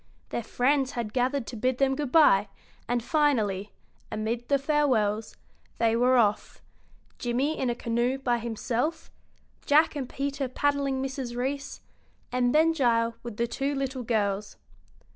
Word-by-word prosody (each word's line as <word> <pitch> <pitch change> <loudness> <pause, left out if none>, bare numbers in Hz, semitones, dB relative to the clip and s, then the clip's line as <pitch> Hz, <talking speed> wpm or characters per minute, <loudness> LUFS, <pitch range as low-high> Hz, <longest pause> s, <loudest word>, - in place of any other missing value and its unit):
Their - - -2
friends 265 +4 +1
had 230 -3 -4
gathered 255 +1 0
to - - -7
bid 255 +3 0
them 270 0 +2
good 285 -2 -3
bye, 210 -11 +5 0.4
and 240 -1 0
finally, 220 - +1 0.4
amid 225 +3 -3
the 280 - +4
farewells, 255 -8 +1 0.4
they 230 -1 +2
were 250 +2 +4
off, 210 -3 +1 0.6
Jimmie 255 +6 0
in 260 - -1
a 240 - -1
canoe 240 +2 0
by 245 -3 0
himself, 240 +7 -3 0.5
Jack 305 +2 +4
and 265 -4 -4
Peter 275 0 -2
paddling 275 0 0
Mrs. 265 -3 -4
Reece, 275 +3 -3 0.5
and 245 -1 +2
Ben 315 +3 +4
Gile 235 -5 +2
with 235 -3 -8
the 235 - +1
two 275 +4 -2
little 270 -1 -3
girls. 205 -3 -1
250 Hz, 145 wpm, -27 LUFS, 230-275 Hz, 0.6 s, bye